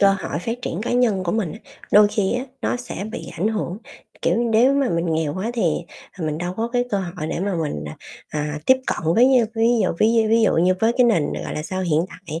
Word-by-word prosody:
cơ 200 - +6
hội 170 -5 -3
phát 230 +7 -4
triển 175 - -3
cá 240 - -2
nhân 225 -7 +2
của 170 - -1
mình, 210 -8 -1
á, 215 - -9 0.3
đôi 205 0 +7
khi 205 -1 0
á, 250 +2 -2 0.2
nó - - 0
sẽ 245 -5 -6
bị - - -6
ảnh 205 +5 +1
hưởng, 210 -3 -3 0.4
kiểu, - - +2
nếu 235 +2 +3
mà 275 -2 +2
mình 170 +1 0
nghèo 160 -1 -1
quá 195 +5 -2
thì, 235 - -1 0.6
ờ, 165 - -3
mình 155 0 -2
đâu 175 +1 -3
có 230 +1 -1
cái 245 -1 +2
cơ 200 - +1
hội 175 -4 -5
để 165 - -3
mà 195 0 -1
mình, 75 - -4
à, - - -8 0.3
à, 150 0 -3
tiếp 260 - +6
cận 165 -1 0
với, 255 +2 +5
a, 230 - +2
ví 225 +1 +3
dụ - - +2
ví 215 - +4
d 225 -1 +3
ví 230 0 +4
dụ - - +3
như 180 +2 +4
với 225 +1 +3
cái 250 - +6
nền, 205 -11 +2
gọi - - -5
là 150 - -3
sao, 185 +3 -3
hiện 160 -4 +2
tại, 165 -3 -8
200 Hz, 265 wpm, -22 LUFS, 170-230 Hz, 0.6 s, đôi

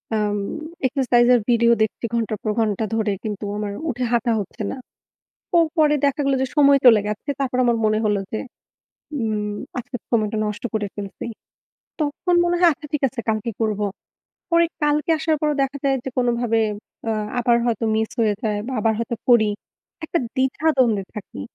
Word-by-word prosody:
আম 210 -1 0 0.5
exercise 245 -3 +3
এর - - +4
video 235 0 +4
দেখছি 220 +2 -3
ঘন্টার 225 -2 -1
পর 215 - 0
ঘন্টা 220 -1 +1
ধরে 220 -2 +1
কিন্তু 210 -2 -4
আমার 210 -1 -3 0.2
উঠে 250 -2 -2
হাঁটা 235 0 +2
হচ্ছে 205 +2 -6
না। - - -6 0.8
তো 345 - +3 0.2
পরে 300 -1 +5
দেখা 280 +2 0
গেল 275 - +3
যে - - +1
সময় 280 -1 +6
চলে 225 -3 +8
গেছে। 210 +6 -5
তারপর 255 -2 -1
আমার 240 -1 +3
মনে 215 0 +2
হল 205 - +2 0.2
যে 220 - -2 0.8
উম 210 -2 -1 0.3
আজকের 245 +1 -7
সময়টা 215 -2 +1
নষ্ট 210 +2 -4
করে 210 -2 -1
ফেলছি। 200 -2 -6 0.8
তখন 305 +4 0
মনে 345 0 +1
হয় 350 -2 +7
আচ্ছা 300 +1 -10
ঠিক 300 - -1
আছে 250 -1 -6
কালকে 215 +1 -1
করব। 215 -2 0 0.7
পরে 335 0 +5 0.2
কালকে 295 +1 +1
আসার 315 0 +1
পরও 300 -1 +1
দেখা 275 +1 -2
যায় 270 -1 +3
যে 265 - -3
কোনভাবে 240 -2 +1 0.5
আ - - +1 0.3
আবার 240 -1 +3
হয়তো 230 -1 0
miss 220 0 0
হয়ে 215 -2 +3
যায় 210 -3 0
বা 265 - -4
আবার 220 +1 +2
হয়তো 230 0 -2
করি। 225 -4 +5 0.5
একটা 335 +2 0 0.2
দ্বিধা-দ্বন্দ্বে 260 -5 +2
থাকি। 200 - -8
235 Hz, 175 wpm, -22 LUFS, 215-270 Hz, 0.8 s, চলে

